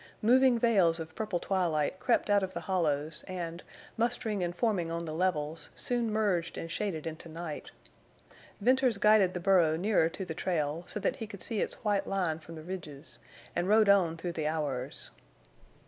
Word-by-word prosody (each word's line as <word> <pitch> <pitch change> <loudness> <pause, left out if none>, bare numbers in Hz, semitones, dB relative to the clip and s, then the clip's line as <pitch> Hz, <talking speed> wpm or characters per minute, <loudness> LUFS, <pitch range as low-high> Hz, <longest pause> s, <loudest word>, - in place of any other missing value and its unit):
Moving 255 +2 +5
veils 195 -8 +3
of 160 0 -7
purple 210 -4 -2
twilight 175 -3 0
crept - - +2
out 205 0 +5
of 190 -1 -4
the - - -3
hollows 155 -4 -1
and, 175 -2 -5 0.4
mustering 225 -4 0
and 175 0 -2
forming 180 -6 0
on 170 0 -3
the 155 - -5
levels, 160 -2 -1
soon 240 -3 -1
merged 200 -6 0
and 165 - -5
shaded 175 -5 -3
into 165 +1 -6
night. 160 -1 -6 0.9
Venters 255 0 +3
guided 210 -3 +4
the - - -1
burro 175 -4 +4
nearer 185 -3 +2
to 190 +3 -5
the 160 - -4
trail, 160 -2 -1
so - - -3
that - - -1
he 225 - -5
could 200 -3 -2
see 225 -4 +2
its - - -3
white 205 -2 +1
line 180 -5 -1
from 165 +1 -11
the 155 - -9
ridges, 160 -5 -7 0.4
and 175 +2 0
rode 215 -1 +5
on 180 -5 +4
through 175 +1 -3
the 155 -2 -2
hours. 145 -4 -3
180 Hz, 180 wpm, -30 LUFS, 160-205 Hz, 0.9 s, Moving